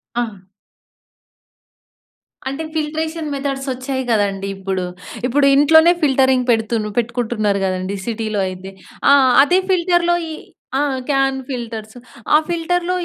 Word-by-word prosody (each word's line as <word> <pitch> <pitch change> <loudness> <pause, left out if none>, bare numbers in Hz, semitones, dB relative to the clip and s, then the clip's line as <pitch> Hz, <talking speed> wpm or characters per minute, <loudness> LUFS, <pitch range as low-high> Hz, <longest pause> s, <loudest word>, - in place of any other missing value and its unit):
ఆ! 240 0 +1 2.2
అంటే 275 +4 -4
filtration 315 0 -3
methods 275 0 -3
వచ్చాయి 260 +1 -4
కదండీ 200 -2 0
ఇప్పుడు. 190 -1 -3 0.4
ఇప్పుడు 280 +3 +2
ఇంట్లోనే 320 +4 +6
ఫిల్టింగ్ 260 -2 +3
పెడుతుండ్రు 220 -2 0
పెట్టుకుంటున్నరు 225 -4 -1
కదండీ 185 +1 -2
సిటీలో 220 -3 -2
అయితే. 185 +1 -9 0.4
ఆ! - - +8 0.3
అదే 360 +5 +3
ఫిల్టర్‌లో 350 -1 +2
ఈ - - -6 0.5
ఆ! - - +1 0.3
క్యాన్ 270 -1 +2
ఫిల్టర్స్ 225 -4 -6 0.4
ఆ - - +9
ఫిల్టర్‌లో 350 +1 -1
260 Hz, 110 wpm, -19 LUFS, 215-310 Hz, 2.2 s, ఆ